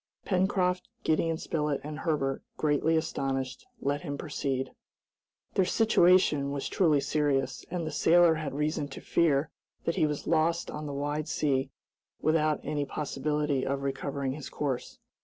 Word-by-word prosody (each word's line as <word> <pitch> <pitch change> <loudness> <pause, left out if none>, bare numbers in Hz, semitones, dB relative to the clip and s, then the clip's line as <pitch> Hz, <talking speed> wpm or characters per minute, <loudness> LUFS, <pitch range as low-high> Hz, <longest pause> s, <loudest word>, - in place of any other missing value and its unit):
Pencroft, 185 -1 +1 0.2
Gideon 160 +1 +1
Spilett, 150 -3 -1
and 150 +1 -6
Herbert, 140 -5 0 0.2
greatly 155 +2 +2
astonished, 135 - -2
let 145 +1 0
him 145 -4 -4
proceed. 135 -3 -2 0.8
Their 190 - +3
situation 180 -9 +4
was 140 -1 -3
truly 160 -6 +3
serious, 140 -2 0
and 170 -2 -2
the 155 - -3
sailor 170 +3 +5
had 155 -4 -4
reason 150 0 -1
to 135 - -9
fear 155 -2 +2 0.3
that 170 - 0
he 155 - +4
was 150 -1 -3
lost 165 +1 +1
on 150 0 -5
the - - -4
wide 145 +2 -2
sea 135 -2 0 0.5
without 155 -1 +2
any 150 -1 -1
possibility 150 -1 -1
of 140 0 -2
recovering 140 0 -2
his 145 +1 -6
course. 135 -4 -3
150 Hz, 145 wpm, -29 LUFS, 140-160 Hz, 0.8 s, sailor